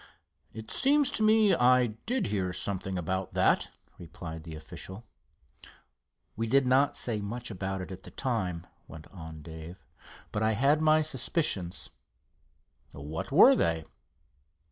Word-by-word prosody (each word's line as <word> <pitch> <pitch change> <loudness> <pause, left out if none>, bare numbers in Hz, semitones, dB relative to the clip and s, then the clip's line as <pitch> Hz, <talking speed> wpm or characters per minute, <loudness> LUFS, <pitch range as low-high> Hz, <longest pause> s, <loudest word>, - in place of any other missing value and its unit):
"It 110 -1 -9
seems 285 0 +3
to - - -2
me 215 -2 +5
I 125 -4 +4 0.2
did 255 +2 0
hear 95 -3 -2
something 95 -1 -3
about 95 +2 -3
that," - - +2 0.3
replied 80 -1 -8
the 80 -1 -8
official. 95 +7 -9 1.3
"We 115 +2 -2
did 135 +3 +3
not 130 +3 +3
say 110 -4 0
much 115 +4 -5
about 95 -1 -4
it 95 - -8
at 95 0 -8
the - - -12
time," 95 -10 -3 0.2
went 80 -2 -11
on 80 -4 -10
Dave; 80 +2 -10 0.5
"but 105 - -2
I 110 0 +2
had 140 +7 +2
my 155 0 +4
suspicions." 130 - 0 1.0
"What 75 +3 -6
were - - +7
they?" 80 -2 0
100 Hz, 140 wpm, -29 LUFS, 85-130 Hz, 1.3 s, were